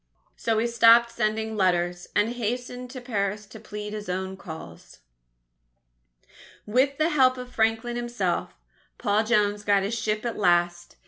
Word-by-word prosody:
_ - - -53 0.3
So 225 -1 -1
he 225 - +1
stopped 235 0 +5
sending 220 -1 -1
letters, 175 -2 0
and 210 +2 +3
hastened 245 +2 -4
to 255 +1 -7
Paris 210 -3 -2
to 220 - -12
plead 210 -1 -7
his 210 -2 -6
own 190 +1 -3
cause. 160 - -11 1.6
With 260 +6 +1
the 310 +1 +2
help 260 -5 +3
of 250 0 -8
Franklin 225 +2 0
himself, 220 - -2 0.4
Paul 210 +2 +1
Jones 210 -2 +1
got 200 -1 +3
his 200 +4 -2
ship 215 -1 -2
at 235 - -3
last. 175 -2 +1
215 Hz, 150 wpm, -25 LUFS, 200-240 Hz, 1.6 s, stopped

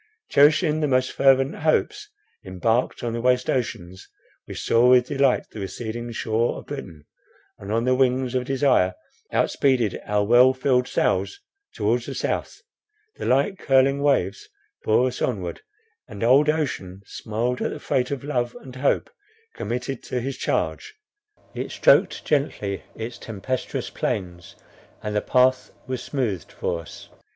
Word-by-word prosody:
Cherishing 150 +2 +4
the 150 - +1
most 130 -1 +1
fervent 135 +1 +3
hopes, 415 - 0 0.3
embarked 110 +8 -1
on 120 -1 -2
the 115 - -3
waste 125 0 +2
ocean, 105 -8 -3 0.5
we - - -7
saw 120 +2 +3
with 125 -1 +6
delight 135 -1 +1
the 110 - -8
receding 120 +4 -5
shore 115 +1 -1
of - - -10
Britain, 85 - -8 0.5
and 100 +1 -7
on 115 +2 +1
the 130 - +3
wings 130 -1 +1
of 125 -1 0
desire 130 -9 +2 0.4
outspeeded 125 -8 +1
our 105 0 +1
well 125 +4 +5
filled 125 -1 +1
sails 395 - 0 0.4
towards - - 0
the - - -5
South. - - -3 0.5
The - - -4
light 140 +10 +2
curling 135 +1 +3
waves 145 - 0 0.3
bore 110 +3 +3
us 125 -1 -3
onward, 95 -8 -2 0.5
and 100 - -7
old 135 +6 +5
ocean 100 - -2
smiled 115 +5 -3
at - - 0
the - - -6
freight 125 -1 0
of 140 -2 -4
love 125 -4 -2
and 130 -1 -12
hope 140 +2 +1 0.5
committed 125 +2 -4
to 125 - -2
his 135 +2 -4
charge; 430 0 -2 0.6
it - - -4
stroked - - +3
gently 105 -9 -1
its 115 +2 -6
tempestuous 115 +4 -4
plains, 90 -3 -4 0.5
and 105 0 -3
the 105 - +2
path 130 0 +2 0.2
was 130 -2 -4
smoothed 115 - -3
for 85 - -3
us. 80 - -12
125 Hz, 150 wpm, -23 LUFS, 110-135 Hz, 0.6 s, with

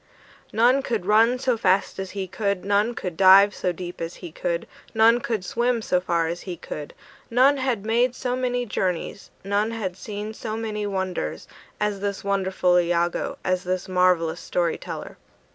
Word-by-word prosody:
None 245 +5 +4
could 225 -8 -2
run 225 +4 +4
so 255 -1 +1
fast 195 -2 +1
as 190 0 -4
he 190 -1 -2
could, 200 0 -2
None 205 +4 +2
could 180 -7 -4
dive 195 +3 +7
so 180 - -1
deep 175 0 -7
as 165 +1 -4
he 175 -3 -9
could, 170 +1 -2 0.3
None 225 +2 +5
could 220 -5 -3
swim 235 +1 0
so 180 -3 +1
far 170 -2 0
as 170 +2 -4
he 180 -3 -6
could; 150 -2 -8 0.3
None 260 +4 +4
had 255 -6 -1
made 240 +3 +2
so 250 -1 -2
many 245 -1 -1
journeys, 190 -3 -3
None 200 +2 0
had 210 -6 -4
seen 210 +2 -6
so 215 0 -5
many 210 -2 -3
wonders, 190 - -3 0.3
As 210 -1 -1
this 200 0 -3
wonderful 190 -2 +1
Iagoo, 175 0 0
As 185 -1 0
this 185 0 -2
marvellous 180 -3 +2
story 170 -2 -1
teller! - - -7
200 Hz, 175 wpm, -24 LUFS, 180-225 Hz, 0.3 s, dive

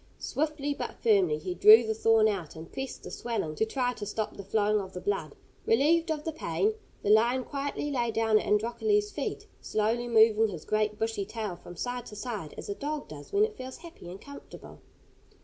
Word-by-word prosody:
Swiftly 295 -1 -2
but - - -5
firmly 195 -9 +3
he 180 +4 -4
drew 220 +5 +8
the 220 - 0
thorn 220 0 +4
out, 185 -8 -3
and 160 +1 -10
pressed 265 0 -6
the - - -8
swelling 225 -10 -3
to 220 +8 0
try 250 +1 0
to 210 - -8
stop 210 +1 -3
the 200 - -8
flowing 210 +1 +1
of 190 -1 -9
the 180 - -5
blood. 180 -6 -2 0.3
Relieved 320 +8 +3
of 305 -2 -2
the 320 - -2
pain, 405 +7 0 0.3
the - - 0
lion 240 +4 +4
quietly 285 +1 -3
lay 240 -4 0
down 225 -1 +3
at - - -5
Androcles' 410 - +1
feet, - - -4 0.2
slowly 225 +3 0
moving 225 -1 +5
his 175 -7 -7
great 215 0 0
bushy 225 -2 -1
tail 210 -2 -5
from 175 - -12
side 245 +5 -4
to 210 - -10
side 210 -8 -5
as - - -7
a 200 - -2
dog 295 +6 -4
does 145 -1 -10
when 410 +1 +4
it 435 -1 -7
feels 260 0 -8
happy 335 - -12
and 185 +2 -8
comfortable. 280 +5 -12
225 Hz, 205 wpm, -29 LUFS, 205-270 Hz, 0.3 s, drew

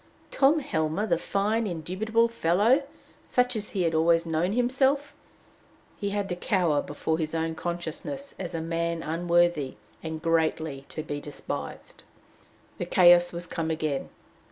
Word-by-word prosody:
Tom 280 +3 +4
Helmer, 160 - -1
the 170 -6 +1
fine, 210 +5 0
indubitable 200 +7 0
fellow! 230 - +3 0.4
such 250 0 +1
as 210 -1 -3
he 190 -3 -1
had 165 -1 +1
always 165 +1 +3
known 165 +4 0
himself! 265 +4 +1 0.8
he 200 - -3
to 200 -3 -2
cower 175 -5 +1
before 160 +2 -2
his 155 0 -2
own 160 0 -1
consciousness 175 - -5
as 175 -3 -4
a 165 - -2
man 165 0 -2
unworthy, 170 -3 +1 0.3
and 160 -1 -5
greatly 160 -3 0
to 155 - -5
be 145 -2 -4
despised! 145 -1 -7 0.8
The - - -1
chaos 175 -1 +6
was 170 0 -4
come 165 -2 -3
again! 155 -3 -2
170 Hz, 140 wpm, -27 LUFS, 160-205 Hz, 0.8 s, chaos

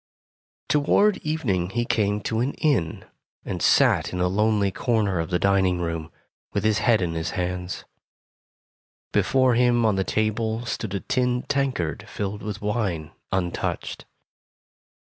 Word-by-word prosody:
Toward 190 +8 +3
evening 115 - -1
he 120 +3 -1
came 105 -2 +1
to 110 +1 -2
an 130 +4 -1
inn, 115 - 0 0.4
and - - -4
sat - - +4
in 90 - -3
a 90 - +2
lonely 105 +1 +2
corner 105 -4 0
of 80 - -2
the 90 - +2
dining 95 -1 +2
room, 85 -2 -3 0.4
with 100 - 0
his 110 -1 +2
head 110 -6 +3
in 85 -2 -1
his 80 +1 -2
hands. 90 -7 -3 1.3
Before 130 -2 +3
him, 120 -1 +3
on 105 -3 +2
the 95 - +2
table, 110 +3 -1
stood 110 -4 -3
a 100 - -2
tin 125 -1 0
tankard 130 - -1
filled 105 0 -4
with 105 0 -5
wine, 100 -8 -1 0.2
untouched. 90 -2 -2
105 Hz, 145 wpm, -24 LUFS, 90-120 Hz, 1.3 s, sat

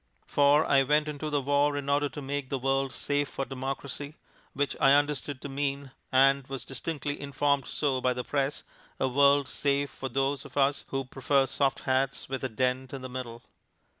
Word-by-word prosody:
For 145 +2 +4
I 140 -1 +4
went 150 +3 +2
into 150 0 -4
the 145 -1 +1
war 145 +1 +2
in 140 -1 -4
order 145 +1 +2
to 145 - -8
make 140 -1 -3
the 135 - -1
world 135 +1 0
safe 145 +2 -1
for 135 - -3
democracy, 135 +2 -5 0.4
which 145 0 -1
I 135 - +7
understood 145 -1 +1
to - - -4
mean 140 0 -3 0.2
(and 135 0 +4
was 135 -1 -6
distinctly 145 +2 -4
informed 140 0 0
so 135 -4 0
by 125 0 +2
the 125 0 -4
press) 140 +1 -1 0.4
a 130 - +2
world 140 +1 +4
safe 140 +1 0
for 130 - -6
those 135 +2 0
of - - -12
us 140 0 +2
who 135 -1 -3
prefer 135 +1 +1
soft 135 0 0
hats 130 +1 0
with 135 0 -4
a 130 - -1
dent 130 +3 -1
in 135 -2 -6
the 130 - -5
middle. 125 -2 -6
140 Hz, 195 wpm, -28 LUFS, 130-145 Hz, 0.4 s, I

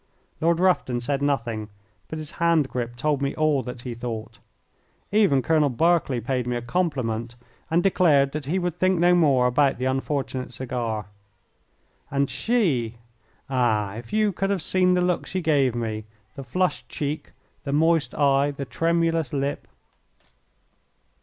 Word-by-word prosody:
Lord 165 +1 +2
Rufton 175 -9 +2
said 140 +3 -2
nothing, 115 -7 -1 0.4
but 160 - -6
his 155 -2 -7
hand 165 -4 +3
grip 120 -1 -4
told 145 +3 0
me 140 0 -1
all 155 -3 +2
that 125 -1 -7
he 125 -1 -5
thought. 115 -2 -6 0.7
Even 195 -11 +3
Colonel 155 -3 +3
Berkeley 155 -1 +2
paid 125 +1 -2
me 125 - -1
a 120 - -2
compliment, 120 -7 -1 0.3
and 170 +2 +2
declared 150 -8 +4
that 150 -1 -5
he 175 +6 0
would 175 -2 -2
think 185 0 +3
no 175 +1 +4
more 140 -8 +4
about 135 +2 +2
the 125 - -3
unfortunate 130 -1 -2
cigar. 120 -5 -3 1.0
And 140 0 0
she 150 - 0 0.5
ah, 115 -7 +1
if 115 +1 -9
you 215 -1 +2
could 195 +1 -2
have 195 -5 0
seen 180 0 +3
the 180 - +2
look 180 -1 0
she 185 - -2
gave 145 -7 +2
me, 110 -2 -3 0.3
the 135 - -7
flushed 180 +9 -1
cheek, 150 0 -4 0.3
the 140 - -3
moist 160 +1 +2
eye, 140 -1 +3
the 140 -1 -5
tremulous 165 -1 0
lip! 140 0 -2
140 Hz, 155 wpm, -24 LUFS, 125-170 Hz, 1.0 s, declared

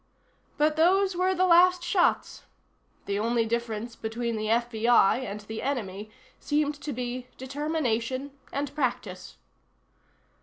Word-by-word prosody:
But 305 +1 +2
those 375 +3 +3
were 370 +1 +1
the 370 +1 +3
last 360 0 +5
shots. 355 0 +1 0.6
The 200 0 -1
only 230 +1 +1
difference 235 0 -3
between 230 +1 -3
the 215 0 -3
FBI 235 -1 +3
and 210 -5 -5
the 220 +1 -6
Enemy 215 -7 -3 0.3
seemed 295 0 0
to 300 - -4
be 250 0 -4
determination 265 -2 -2 0.2
and 280 0 -3
practice. 230 -10 -3
250 Hz, 120 wpm, -27 LUFS, 225-305 Hz, 0.6 s, last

